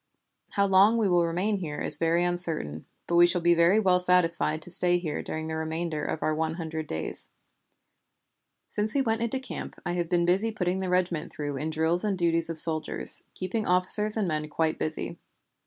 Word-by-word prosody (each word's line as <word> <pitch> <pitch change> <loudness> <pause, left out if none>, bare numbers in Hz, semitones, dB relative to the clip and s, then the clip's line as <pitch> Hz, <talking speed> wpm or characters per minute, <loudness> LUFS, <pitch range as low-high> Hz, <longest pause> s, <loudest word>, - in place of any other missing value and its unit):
"How 200 - +2
long 200 +4 +4
we 220 -3 +1
will 175 -2 +2
remain 190 +5 -1
here 155 -6 -6
is - - -2
very 165 +1 +1
uncertain, 165 - -1 0.2
but 170 - 0
we 175 0 +7
shall 175 +1 +1
be 170 0 +3
very 170 +5 +3
well 185 -4 +2
satisfied 170 -3 +2
to 175 - -1
stay 175 0 +4
here 160 -4 -4
during 160 0 -5
the 160 0 -4
remainder 160 -1 -4
of 155 - -4
our 155 - 0
one 160 +1 -2
hundred 160 -2 -5
days. 80 - -4 1.4
Since 210 +3 -2
we 275 - +2
went 225 -2 -1
into 235 +3 -1
camp 260 - -7
I 175 - -2
have 175 -1 -3
been 175 -1 +1 0.3
putting 185 -2 -2
the 190 -1 -3
regiment 180 -3 -1
through 145 -1 -5
in 150 +3 -3
drill 160 +2 0
and 205 -3 -1
duties 165 -1 +1
of 165 - -4
soldiers, 155 0 +3
keeping 200 +4 -3
officers 210 +4 +3
and 210 -4 0
men 155 -2 -3
quite 160 +1 -1
busy. 155 0 -3
175 Hz, 195 wpm, -26 LUFS, 160-185 Hz, 1.4 s, we